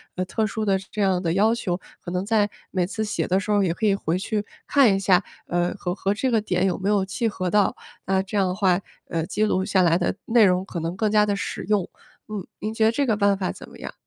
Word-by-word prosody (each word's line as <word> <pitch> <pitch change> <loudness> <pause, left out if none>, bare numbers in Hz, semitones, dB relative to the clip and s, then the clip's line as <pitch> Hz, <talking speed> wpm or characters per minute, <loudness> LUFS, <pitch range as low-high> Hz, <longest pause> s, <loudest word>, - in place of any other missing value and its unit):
呃， 185 - -1
特 215 +4 -1
殊 220 0 -3
的 195 -2 +2 0.2
这 210 - -1
样 190 -2 +2
的 165 -2 0
要 215 +5 +3
求， 180 -6 -2 0.3
可 175 - -4
能 180 +1 -1
在 210 0 +2 0.2
每 185 -2 0
次 210 +4 -3
写 210 - -2
的 185 +1 +2
时 195 - -7
候 205 -1 +3
也 175 -3 +1
可 220 - -2
以 200 - +3
回 175 -3 -1
去 210 +1 -2 0.2
看 255 -8 +5
一 - - 0
下， 185 -2 +3 0.2
呃， 175 0 0
和 180 -3 -3
和 195 0 0
这 255 +5 -1
个 230 -3 +3
点 190 -3 0
有 180 - 0
没 190 - -3
有 205 -2 +3
契 200 +5 -2
合 185 -4 -2
到。 205 +1 +2 0.3
那 190 0 +2
这 195 +2 -4
样 195 -2 +3
的 180 - -1
话， 185 -2 +2 0.3
呃， 165 -1 -1
记 210 - -1
录 190 -3 +1
下 190 - +2
来 170 -2 +4
的 175 +1 -1
内 225 -1 +5
容 180 -1 +2
可 190 -3 -6
能 165 +2 -3
更 215 +2 +1
加 210 0 +4
地 205 -1 0
实 200 - -4
用。 205 -4 +1 0.4
嗯， 210 -3 -5
您 215 - -3
觉 225 0 +2
得 220 - +5
这 280 +4 0
个 220 -3 +2
办 200 -1 +3
法 190 -2 -2
怎 - - -11
么 - - -14
样？ - - -7
195 Hz, 295 characters per minute, -24 LUFS, 185-215 Hz, 0.4 s, 看